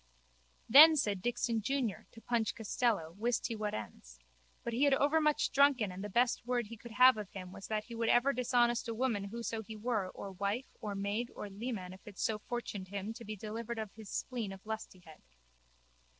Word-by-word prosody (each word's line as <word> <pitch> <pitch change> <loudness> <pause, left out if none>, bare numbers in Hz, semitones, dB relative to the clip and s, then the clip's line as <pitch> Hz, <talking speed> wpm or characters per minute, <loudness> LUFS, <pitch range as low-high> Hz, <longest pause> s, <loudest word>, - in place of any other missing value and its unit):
Then 310 +6 +10
said 205 -10 0
Dixon 235 -1 0
junior 245 -2 -2
to 225 - -13
Punch 235 -2 0
Costello 220 -6 0
wist 235 +2 0
he 230 - -2
what 210 -1 -2
ends. 65 - -8 0.5
But 235 - -3
he 260 +5 +3
had 280 -1 +5
overmuch 300 +2 +2
drunken 270 -7 +4
and 185 +2 -7
the 210 - -4
best 245 +5 +2
word 245 -1 0
he 230 +2 -9
could 230 +1 -11
have 255 -1 +7
of 210 -3 -5
him 185 -2 -8
was 195 - -9
that 215 -1 -1
he 235 - -11
would 230 0 0
ever 265 +3 +4
dishonest 240 -2 +2
a 230 - -3
woman 225 -5 0
whoso 230 +1 -4
she 220 0 -9
were 215 -3 -1
or 195 +1 -8
wife 200 +7 -3
or 205 -2 -4
maid 205 +5 -2
or 205 - -6
leman 200 -3 -5
if 190 - -16
it 205 - -10
so 215 -1 0
fortuned 210 -4 -5
him 200 +3 -4
to 235 - -10
be 215 0 -5
delivered 225 +3 -5
of 215 -3 -5
his 215 -2 -11
spleen 235 -6 -3
of 195 +1 -11
lustihead. 185 -7 -7
225 Hz, 205 wpm, -33 LUFS, 200-240 Hz, 0.5 s, Then